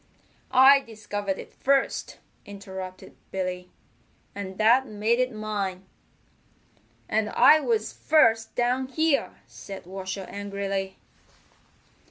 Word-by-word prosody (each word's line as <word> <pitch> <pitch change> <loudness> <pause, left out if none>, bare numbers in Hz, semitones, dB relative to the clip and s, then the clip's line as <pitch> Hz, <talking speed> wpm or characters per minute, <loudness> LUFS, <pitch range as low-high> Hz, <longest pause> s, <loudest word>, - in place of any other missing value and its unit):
"I 270 +2 +7
discovered 205 -5 -5
it - - -10
first," 275 0 0 0.3
interrupted 190 -2 -9
Billy, 180 -1 -4 0.6
"and 190 -1 -7
that 240 +5 +4
made 215 +2 0
it 255 0 +1
mine." 205 -4 -4 1.2
"And 215 -1 0
I 310 - +6
was 230 -6 -1
first 230 -8 +2
down 250 +2 0
here," 315 +2 0
said 195 -3 -10
Washer 190 +1 -6
angrily. 200 -1 -4
210 Hz, 100 wpm, -26 LUFS, 195-245 Hz, 1.2 s, I